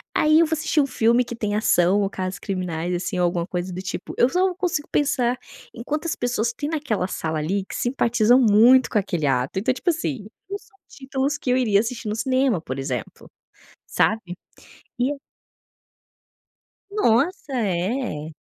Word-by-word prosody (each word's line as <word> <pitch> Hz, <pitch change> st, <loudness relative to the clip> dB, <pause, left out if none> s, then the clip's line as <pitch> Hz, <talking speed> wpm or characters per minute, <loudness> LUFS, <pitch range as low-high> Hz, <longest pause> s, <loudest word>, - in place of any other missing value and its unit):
Aí 310 Hz, +1 st, +5 dB
eu 335 Hz, -, +5 dB
vou 320 Hz, -, -2 dB
assistir 315 Hz, -1 st, +1 dB
um -, -, +2 dB
filme 235 Hz, +1 st, +3 dB
que 240 Hz, -, -7 dB
tem 210 Hz, -3 st, -2 dB
ação 200 Hz, -1 st, +3 dB
ou 195 Hz, -, 0 dB
casos 185 Hz, -1 st, -4 dB
criminais, 180 Hz, -3 st, -3 dB
assim, 185 Hz, +2 st, -3 dB
ou 180 Hz, -, +2 dB
alguma 170 Hz, -1 st, -1 dB
coisa 180 Hz, 0 st, -3 dB
do 185 Hz, -, -5 dB
tipo, 180 Hz, 0 st, -6 dB
eu 240 Hz, -, +5 dB
só 365 Hz, +2 st, +1 dB
consigo 345 Hz, -5 st, -2 dB
pensar 250 Hz, -4 st, +1 dB, 0.4 s
em 230 Hz, -, -9 dB
quantas 310 Hz, +5 st, -2 dB
pessoas 235 Hz, -1 st, -1 dB
têm 290 Hz, +4 st, -4 dB
naquela 285 Hz, -, -1 dB
sala 160 Hz, -3 st, -3 dB
ali 190 Hz, +6 st, -1 dB
que -, -, -8 dB
simpatizam 240 Hz, -1 st, +3 dB
muito 240 Hz, +4 st, +6 dB
com 215 Hz, -, +2 dB
aquele 175 Hz, -5 st, -2 dB
ato. 130 Hz, +5 st, 0 dB
Então, 255 Hz, +5 st, +1 dB
tipo 355 Hz, -, -2 dB
assim, 290 Hz, -, -2 dB, 0.2 s
não 400 Hz, -, -3 dB
são 400 Hz, -, -24 dB
títulos 270 Hz, +1 st, -2 dB
que 255 Hz, -, -4 dB
eu -, -, +3 dB
iria 215 Hz, -6 st, +3 dB
assistir 230 Hz, 0 st, -3 dB
no 210 Hz, -, -2 dB
cinema, 255 Hz, -4 st, +1 dB
por 130 Hz, -4 st, -5 dB
exemplo, 130 Hz, -4 st, -5 dB, 0.6 s
sabe? 190 Hz, -5 st, 0 dB, 0.6 s
E 250 Hz, +3 st, +2 dB
eu 285 Hz, -1 st, -6 dB, 1.7 s
Nossa, 295 Hz, -, +1 dB
é. 190 Hz, -, -2 dB
230 Hz, 175 wpm, -23 LUFS, 185-275 Hz, 1.7 s, muito